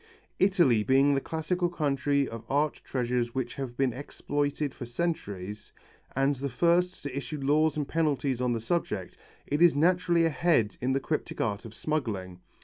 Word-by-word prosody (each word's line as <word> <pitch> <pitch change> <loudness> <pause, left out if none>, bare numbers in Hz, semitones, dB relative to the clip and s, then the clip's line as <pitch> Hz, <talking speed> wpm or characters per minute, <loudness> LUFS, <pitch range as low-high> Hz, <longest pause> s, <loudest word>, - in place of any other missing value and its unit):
Italy 175 - +4
being 135 +4 +4
the 135 - +1
classical 175 +4 -1
country 140 -3 +1
of 115 -1 -7
art 145 +2 0
treasures 125 -1 -1
which 125 -2 -2
have 130 -3 -6
been 135 -3 +1
exploited 145 +1 -2
for 120 - -8
centuries, 105 - -4 0.4
and 135 +2 +3
the 140 +2 -3
first 175 +7 +1
to 140 -2 -5
issue 145 +2 -4
laws 150 +2 +2
and 145 -2 -1
penalties 140 -6 0
on 125 -1 +1
the 115 - -2
subject, 110 - -2 0.3
it 145 +3 -1
is 175 -3 +6
naturally 170 +1 +3
ahead 155 - +2
in 130 +2 +1
the 135 - +2
cryptic 155 +3 -3
art 105 -2 -1
of 110 -1 -10
smuggling. 105 - -3
140 Hz, 165 wpm, -28 LUFS, 120-155 Hz, 0.4 s, is